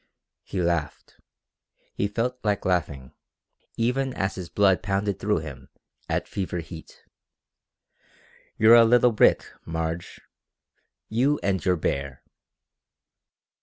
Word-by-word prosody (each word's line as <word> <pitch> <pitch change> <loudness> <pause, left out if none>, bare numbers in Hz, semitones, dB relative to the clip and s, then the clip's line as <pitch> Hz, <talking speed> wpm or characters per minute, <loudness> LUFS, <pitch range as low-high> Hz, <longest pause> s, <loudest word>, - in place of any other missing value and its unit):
He 95 - -5
laughed. 85 -4 -3 0.7
He 100 - -1
felt 120 +5 -2
like 105 -2 -1
laughing, 80 -8 -2 0.6
even 125 +3 0
as 95 0 -1
his 90 -3 -7
blood 100 -3 +3
pounded 100 0 -1
through 105 -5 0
him 70 -4 -10 0.4
at - - -1
fever 95 -2 -4
heat. 85 -1 -10 1.5
"You're 110 +1 +6
a 120 -1 +9
little 120 +1 +4
brick, 110 - +4 0.2
Marge 80 +1 -4 0.9
you 135 +6 +1
and 95 -4 0
your 90 - +2
bear!" 70 -4 -3
95 Hz, 110 wpm, -25 LUFS, 80-115 Hz, 1.5 s, a